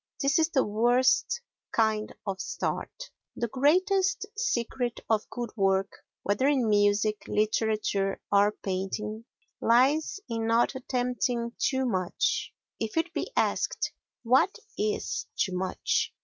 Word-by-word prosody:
This 280 +3 +2
is 320 0 +3
the 270 -5 +2
worst 245 - +2 0.3
kind 220 -1 +1
of 195 -2 -3
start. - - -4 0.2
The 235 - -1
greatest 370 - +2
secret 245 - -1
of 220 -2 0
good 240 -2 -5
work 195 -1 +2 0.3
whether 205 +7 +1
in 270 -5 +2
music, 205 0 +3
literature 210 -2 0
or 205 +1 +5
painting 210 +3 -4 0.4
lies 270 - +3
in 225 -1 -2
not 230 +3 +3
attempting 245 -2 -1
too 265 -1 +1
much; 185 -7 0 0.3
if 225 +6 -3
it 330 +2 0
be - - -3
asked, - - 0 0.3
"What 255 +10 +3 0.2
is 215 +2 -2
too 185 - 0
much?" 185 0 0
230 Hz, 120 wpm, -28 LUFS, 210-265 Hz, 0.4 s, or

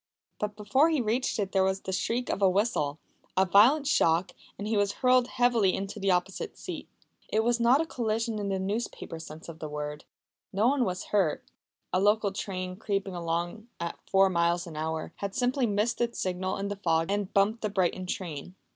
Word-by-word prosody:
But 210 0 -2
before 215 +9 +3
he 315 -3 +1
reached 240 +2 0
it 200 -3 -1
there 190 -1 +3
was 190 0 0
the 190 - -5
shriek 230 +6 -1
of - - -3
a 195 - +6
whistle, 185 -7 0 0.4
a 190 - +5
violent 230 - +5
shock, 170 - +3 0.3
and 205 - -4
he 220 - 0
was 205 -1 +2
hurled 255 +1 +3
heavily 240 -7 +2
into 200 +2 -5
the 195 0 0
opposite 180 +1 -1
seat. - - -6 0.4
It 220 +1 +2
was 240 +1 +2
not 245 +5 +5
a - - -1
collision 225 -5 -1
in 200 -1 -2
the 195 - 0
newspaper 190 -4 -3
sense 160 0 -10
of 165 -1 -9
the 155 - -5
word. 150 0 -5 0.5
No 205 +4 +2
one 265 -1 +3
was 180 -2 -3
hurt. 190 -7 +2 0.5
A 185 - +3
local 205 +1 +3
train, 185 -2 -4
creeping 200 -2 -2
along 175 +5 -3
at 170 0 -4
four 195 0 +5
miles 170 -1 +1
an 165 -3 -9
hour, 160 +1 -3
had 200 -1 -4
simply 250 0 +1
missed 210 +4 0
its 235 0 -1
signal 185 0 -1
in 200 +1 -3
the 205 - -4
fog 165 -2 +1
and 205 -1 -1
bumped 205 +3 +2
the 215 - -1
Brighton 185 -1 0
train. 180 -2 -5
200 Hz, 200 wpm, -28 LUFS, 180-225 Hz, 0.5 s, a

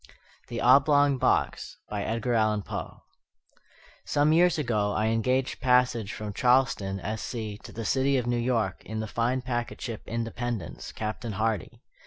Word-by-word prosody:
THE 120 -1 -4
OBLONG 140 +2 +5
BOX - - 0
EDGAR 110 +4 -1
ALLAN 110 -2 +2
POE - - -6 1.0
Some 150 +2 +2
years 175 +1 +4
ago 110 -8 0
I 110 +1 +1
engaged 125 +4 0
passage 125 -4 +2
from 105 -1 -6
Charleston, 125 -6 +2
S. 110 +2 -4
C., 110 -4 -5
to - - -11
the 115 0 -6
city 135 +3 +2
of 125 - -1
New 120 0 0
York, 115 -6 0
in 110 +1 -5
the 110 - -2
fine 120 +4 -1
packet 120 -2 -3
ship 115 -4 -5
Independence, 115 -2 -4
Captain 110 +1 -4
Hardy. 110 -2 -2
115 Hz, 150 wpm, -27 LUFS, 110-130 Hz, 1.0 s, OBLONG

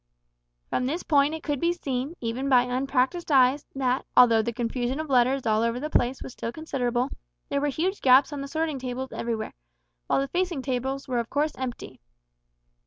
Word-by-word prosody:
From 250 - 0
this 325 +6 -2
point 290 0 +3
it 320 - -8
could 290 -3 -1
be 340 +3 +2
seen, 275 -2 -3
even 245 +4 -2
by 250 -2 +6
unpractised 265 +6 -1
eyes, 265 +1 +4
that, 260 -1 0
although 230 -3 +7
the 235 - -2
confusion 245 +3 -2
of 315 -2 -4
letters 260 +1 +3
all 215 -1 +2
over 230 +1 0
the 305 +3 -4
place 250 +2 +1
was 255 - -8
still 230 - -4
considerable, 255 -3 -2 0.4
there 280 0 0
were 295 - +1
huge 350 +8 -1
gaps 265 +3 +5
on 285 - -4
the 275 - -5
sorting 315 -1 -2
tables 255 +1 -5
everywhere, 230 -2 -3 0.5
while - - +2
the 275 - -1
facing 350 -3 -1
tables 265 +1 -2
were 250 -2 0
of 235 - -4
course 295 +2 0
empty. 255 - -6
265 Hz, 190 wpm, -26 LUFS, 245-290 Hz, 0.5 s, although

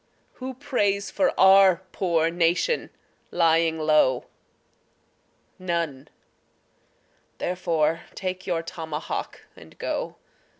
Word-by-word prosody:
Who 260 0 -5
prays 205 -7 -1
for 280 - +2
our 190 -1 +6
poor 165 -3 +1
nation 175 - +1 0.4
lying 165 -1 +2
low? 155 -5 +2 1.3
None 170 -7 -3 1.3
therefore 165 -3 0
take 185 -1 -5
your 170 -2 -1
tomahawk 160 -3 -5
and - - -16
go. - - -3
170 Hz, 85 wpm, -25 LUFS, 160-190 Hz, 1.3 s, our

